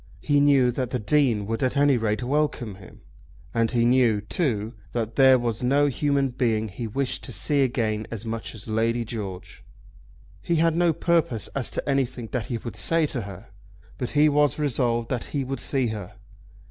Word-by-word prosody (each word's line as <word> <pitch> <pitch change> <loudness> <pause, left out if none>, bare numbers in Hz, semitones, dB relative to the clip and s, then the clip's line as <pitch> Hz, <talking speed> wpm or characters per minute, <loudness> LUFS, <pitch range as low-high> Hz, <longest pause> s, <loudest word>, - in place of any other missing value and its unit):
He 145 0 +2
knew 140 -3 +4
that 125 0 -3
the 125 - -1
Dean 120 -2 +1
would 115 +2 -3
at 130 +1 0
any 145 -1 +4
rate 110 -1 -1
welcome 135 -5 -1
him. 95 -1 -15 0.5
And 115 -1 +1
he 120 -2 +1
knew, 120 -3 +3
too, 110 - -2 0.2
that 115 -1 -3
there 130 -1 +6
was 120 -2 -2
no 140 +4 +3
human 140 0 +1
being 115 -4 0
he 115 +4 -5
wished 135 +4 -2
to - - -7
see 140 +8 +2
again 110 -4 0
so 115 - -9
much 115 0 -5
as 110 0 -11
Lady 115 +2 0
George. 100 -5 -7 0.8
He 170 - 0
had 165 0 +2
no 175 0 +3
purpose 160 -9 0
as 135 -3 -2
to - - -4
anything 130 -4 -1
that 120 -5 -2
he 120 - -2
would 115 0 -7
say 165 -1 +2
to 125 - -2
her, 100 +1 -10 0.5
but 125 - -2
he 150 +1 +6
was 145 -1 +2
resolved 120 -5 0
that 125 -3 -2
he 140 - 0
would 135 +1 -4
see 130 -4 0
her. 105 -4 -6
120 Hz, 190 wpm, -25 LUFS, 110-140 Hz, 0.8 s, there